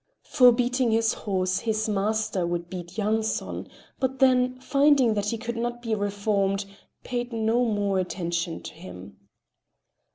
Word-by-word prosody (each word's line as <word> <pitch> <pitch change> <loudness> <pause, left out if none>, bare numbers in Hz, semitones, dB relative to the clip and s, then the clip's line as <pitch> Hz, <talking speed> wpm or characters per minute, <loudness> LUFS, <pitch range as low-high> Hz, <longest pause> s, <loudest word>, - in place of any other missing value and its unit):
For 250 -3 +6
beating 245 +1 +1
the 225 0 +2
horse 185 -2 -1
his 220 -1 -1
master 210 -3 0
would 175 0 -3
beat 175 +1 -7
Yanson, 220 +1 -1 0.3
but 265 0 -1
then, 255 -1 +3
finding 275 -3 +3
that 205 -1 -1
he 230 - -2
could 235 +1 -5
not 240 +1 -3
be 225 -2 -1
reformed, 200 -1 0 0.4
paid 245 0 -3
no 230 +2 +1
more 205 -3 0
attention 170 -2 -3
to - - -8
him. 90 +2 -11
220 Hz, 140 wpm, -26 LUFS, 195-240 Hz, 0.4 s, For